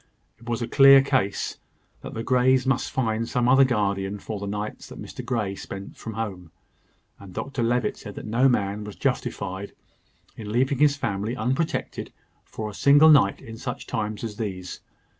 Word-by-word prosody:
It 120 +1 -10
was 120 0 -1
a - - -3
clear 135 0 +7
case 130 -8 -1 0.4
that - - -8
the 115 - -3
Greys 130 +1 +3
must 130 -1 0
find 115 -2 -1
some 120 -1 +1
other 135 +2 +6
guardian 100 -5 0
for 105 +1 -6
the 100 - -5
nights 105 +1 -5
that - - -11
Mr - - -8
Grey 105 -6 -1
spent 100 0 -8
from 110 - -7
home; 100 -6 -5 0.7
and 95 -2 -12
Dr 135 -2 -3
Levitt 120 -1 0
said 105 -3 -9
that - - -7
no 120 +5 +3
man 105 -3 0
was 105 -1 -8
justified 95 +2 -3 0.6
in 105 -2 -7
leaving 130 +3 +1
his 145 -1 +4
family 105 -1 -2
unprotected 130 +7 -2 0.3
for 110 - -6
a 105 - -7
single 145 +8 +6
night 135 -10 +4
in 115 0 -9
such 125 +1 -5
times 105 0 -3
as 105 -2 -5
these. 95 -5 -5
115 Hz, 180 wpm, -25 LUFS, 100-130 Hz, 0.7 s, clear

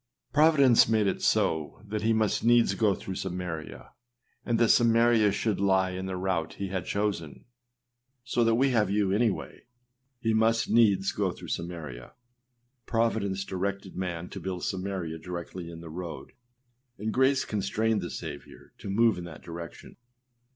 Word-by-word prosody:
Providence 145 -7 +5
made 110 -2 +3
it 100 - -1
so 80 +5 0
that 105 0 -3
he 110 +1 +2
must 110 -2 +1
needs 120 0 +4
go 105 -4 +2
through 95 - -6
Samaria, 90 -4 -5 0.5
and 120 - 0
that 115 -1 +3
Samaria 115 -2 +4
should 105 0 -1
like 95 -1 +2
in 95 +1 -4
the 95 -1 -3
route 90 -3 -1
he 100 -1 -4
had 95 -2 -4
chosen. 100 -8 -2 0.8
So 125 -1 +1
that 115 0 +3
we 135 +3 +3
have 105 -5 +2
you 100 -1 +1
any 110 +4 +3
way. 105 - -7 0.6
âHe 110 - +3
must 115 +1 +2
needs 100 -5 +4
go - - -1
through - - -10
Samaria.â 80 -8 -6 0.7
Providence 110 -4 0
directed 100 +1 -4
man 90 -2 -4
to - - -7
build 95 -2 -5
Samaria 95 -4 -3
directly 85 0 -7
in 85 -1 -9
the 80 -2 -9
road, 85 0 -7 0.7
and 110 +2 -3
grace 130 +1 +3
constrained 105 +1 0
the 85 - -5
Saviour 75 -4 -9
to - - -7
move 115 0 +3
in 85 - -7
that 85 -3 -11
direction. 85 0 -9
100 Hz, 160 wpm, -28 LUFS, 90-115 Hz, 0.8 s, Providence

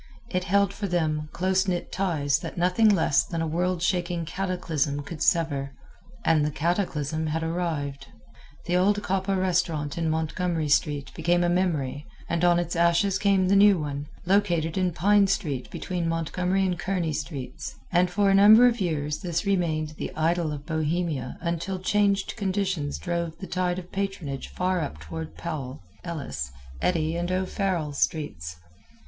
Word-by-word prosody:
It 180 -1 -1
held 200 +1 +2
for 205 - -3
them 155 -4 -1
close 190 +2 +1
knit 175 -2 -2
ties 150 -7 +1
that - - -7
nothing 180 +6 +4
less 155 -8 +3
than 165 - -4
a 165 - 0
worldshaking 175 0 0
cataclysm 165 -5 -2
could 160 +1 -8
sever 140 -5 +1 0.5
and 160 -2 +4
the 150 - +1
cataclysm 160 -2 -1
had 160 +1 -1
arrived. 155 -5 -3 0.6
The 175 - 0
old 200 +3 +3
Coppa 195 +1 0
restaurant 170 -5 0
in 165 -1 0
Montgomery 160 0 -1
street 145 -1 +1
became 175 +2 +1
a 175 - +2
memory 155 -6 0 0.2
and 170 0 -1
on 175 -1 +5
its 175 0 -1
ashes 170 +3 +3
came 195 -2 +3
the 195 - +4
new 200 -1 +7
one, 145 -2 -4 0.2
located 175 -4 +2
in 185 -2 +1
Pine 200 +5 +4
street 145 -9 -2
between 175 -3 -3
Montgomery 180 +4 0
and 180 -2 -1
Kearny 175 -4 -1
streets, 135 -4 -5 0.2
and 180 0 +3
for 200 +2 +2
a - - +4
number 210 +5 +8
of 240 -3 +2
years 150 -4 -1
this 170 -1 -2
remained 165 -6 0
the - - -3
idol 165 0 +1
of 145 -1 -6
Bohemia 160 -4 -1
until 170 +2 -2
changed 200 +1 +1
conditions 190 -7 -1
drove 170 -2 -3
the 190 - -7
tide 180 -1 -1
of 180 -1 -8
patronage 195 -9 -3
far 185 0 -1
up 110 - -4
toward 80 +1 -7
Powell, 135 - -5 0.2
Ellis, 75 - -5 0.3
Eddy 165 -2 +1
and 175 +1 -2
O'Farrell 185 -4 -1
streets. 140 - -2
170 Hz, 160 wpm, -26 LUFS, 150-185 Hz, 0.6 s, number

